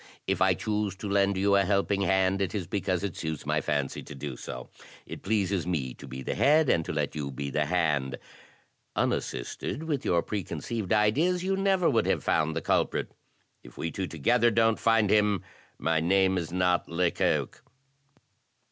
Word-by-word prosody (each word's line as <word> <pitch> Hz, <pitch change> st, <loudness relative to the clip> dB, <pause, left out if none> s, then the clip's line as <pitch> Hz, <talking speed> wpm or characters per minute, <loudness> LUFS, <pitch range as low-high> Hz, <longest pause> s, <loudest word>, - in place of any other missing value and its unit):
"If 95 Hz, -2 st, -1 dB
I 95 Hz, 0 st, +4 dB
choose 105 Hz, +1 st, -2 dB
to 100 Hz, -, -6 dB
lend 100 Hz, 0 st, +2 dB
you 100 Hz, +1 st, +3 dB
a 100 Hz, -, +4 dB
helping 100 Hz, +1 st, +1 dB
hand, 95 Hz, 0 st, +2 dB
it 95 Hz, +2 st, -1 dB
is 95 Hz, -4 st, -2 dB
because 95 Hz, 0 st, -1 dB
it 100 Hz, -4 st, -3 dB
suits 80 Hz, -3 st, -4 dB
my -, -, +1 dB
fancy 70 Hz, -2 st, -2 dB
to -, -, -10 dB
do 70 Hz, -1 st, -6 dB
so. -, -, -7 dB, 0.4 s
It -, -, -8 dB
pleases 100 Hz, -4 st, 0 dB
me 70 Hz, -8 st, -2 dB
to 70 Hz, -, -12 dB
be 65 Hz, +1 st, -7 dB
the -, -, -2 dB
head, 150 Hz, 0 st, +4 dB
and 80 Hz, -, +3 dB
to -, -, -3 dB
let 75 Hz, -2 st, -1 dB
you 75 Hz, -3 st, -4 dB
be 70 Hz, +1 st, -5 dB
the -, -, 0 dB
hand. 75 Hz, -7 st, 0 dB, 0.8 s
Unassisted, 155 Hz, -, -2 dB
with 150 Hz, -5 st, -2 dB
your 85 Hz, -1 st, +2 dB
preconceived 105 Hz, +1 st, -4 dB
ideas,' 150 Hz, +13 st, +2 dB
you 195 Hz, +1 st, +1 dB
never 190 Hz, -2 st, +2 dB
would 115 Hz, -, +2 dB
have -, -, +1 dB
found 80 Hz, 0 st, +1 dB
the 80 Hz, -, -1 dB
culprit; -, -, 0 dB, 0.5 s
if -, -, -15 dB
we 80 Hz, -, -3 dB
two 95 Hz, +2 st, -3 dB
together 120 Hz, -, +2 dB
don't 115 Hz, 0 st, +2 dB
find 115 Hz, -3 st, +3 dB
him, 105 Hz, -3 st, +3 dB, 0.3 s
my 80 Hz, 0 st, +1 dB
name 95 Hz, +3 st, +3 dB
is 85 Hz, -3 st, -3 dB
not 90 Hz, -1 st, +1 dB
Lecoq." 85 Hz, +1 st, 0 dB
95 Hz, 185 wpm, -28 LUFS, 80-105 Hz, 0.8 s, I